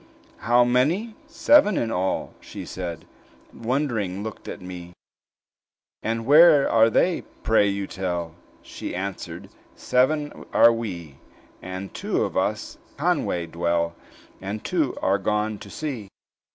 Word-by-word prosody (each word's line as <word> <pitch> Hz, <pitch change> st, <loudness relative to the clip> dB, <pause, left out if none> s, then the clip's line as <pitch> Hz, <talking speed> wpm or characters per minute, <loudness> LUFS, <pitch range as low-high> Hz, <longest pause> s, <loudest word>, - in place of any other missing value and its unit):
"How 120 Hz, +2 st, +4 dB
many? 150 Hz, -, +1 dB
Seven 290 Hz, -, +4 dB
in 115 Hz, -, -1 dB
all," 95 Hz, -1 st, -1 dB
she -, -, -9 dB
said, 90 Hz, -3 st, -6 dB, 0.5 s
And -, -, -14 dB
wond'ring 115 Hz, -7 st, -1 dB
looked 110 Hz, -1 st, -8 dB
at -, -, -6 dB
me. 90 Hz, -1 st, -9 dB, 1.1 s
"And 115 Hz, 0 st, -2 dB
where 150 Hz, +1 st, +7 dB
are 115 Hz, 0 st, +5 dB
they? 175 Hz, +10 st, +2 dB
I -, -, -12 dB, 0.2 s
pray 110 Hz, -2 st, +4 dB
you 100 Hz, 0 st, -1 dB
tell." 90 Hz, -4 st, -4 dB, 0.3 s
She -, -, -7 dB
answered, 95 Hz, +1 st, -6 dB, 0.3 s
"Seven 145 Hz, +4 st, 0 dB
are 115 Hz, -, +7 dB
we; 85 Hz, -11 st, -6 dB, 0.4 s
And 95 Hz, +1 st, -7 dB
two -, -, -1 dB
of -, -, -4 dB
us -, -, -2 dB
at -, -, -30 dB
Conway 85 Hz, -1 st, 0 dB
dwell, 85 Hz, 0 st, -1 dB, 0.5 s
And 100 Hz, +3 st, -5 dB
two 160 Hz, -8 st, -1 dB
are 100 Hz, +1 st, +2 dB
gone 105 Hz, +1 st, -1 dB
to 100 Hz, -, -11 dB
sea. 125 Hz, -7 st, -5 dB
110 Hz, 140 wpm, -24 LUFS, 95-130 Hz, 1.1 s, where